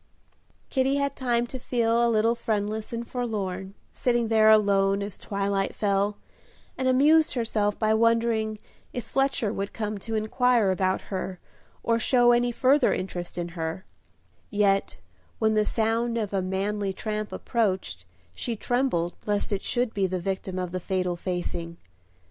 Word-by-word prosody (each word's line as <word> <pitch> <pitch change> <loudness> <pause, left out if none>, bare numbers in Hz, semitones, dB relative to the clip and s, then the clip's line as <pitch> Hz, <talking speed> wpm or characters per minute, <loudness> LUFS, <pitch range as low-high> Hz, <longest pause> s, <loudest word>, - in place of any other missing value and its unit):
Kitty 265 +1 +2
had 280 -1 0
time 240 -2 0
to 260 +2 -7
feel 235 -1 +1
a 235 - +3
little 225 +1 +3
friendless 215 -2 -2
and 235 0 -4
forlorn, 195 -6 -3 0.2
sitting 240 -2 +1
there 220 -1 +5
alone 200 -2 +4
as 200 -1 -5
twilight 200 -1 -2
fell, 200 0 +1 0.6
and 260 - -1
amused 300 +5 +4
herself 215 -3 0
by 215 -1 +2
wondering 225 -1 +2 0.4
if 245 - -4
Fletcher 270 -5 0
would 200 -1 -4
come 210 -2 -3
to 225 +3 -4
inquire 220 -1 +2
about 185 0 0
her, 185 0 -3 0.5
or 230 0 +2
show 240 +1 +4
any 240 0 +3
further 260 +3 +3
interest 180 -2 -4
in 175 0 -3
her; 165 +2 -4 0.6
yet 200 -1 +1 0.4
when 220 -1 +2
the 215 0 +2
sound 230 +2 0
of 210 -3 -2
a 195 - +1
manly 195 +2 -1
tramp 215 +1 -4
approached, 190 - -1 0.3
she 230 - -3
trembled 235 -8 0
lest 205 0 0
it 200 -1 -1
should 245 -2 0
be 195 -2 +1
the 185 0 -2
victim 190 0 -3
of 180 -1 -3
the 185 - -2
fatal 180 -1 -1
facing. 175 -1 -4
215 Hz, 155 wpm, -26 LUFS, 195-235 Hz, 0.6 s, there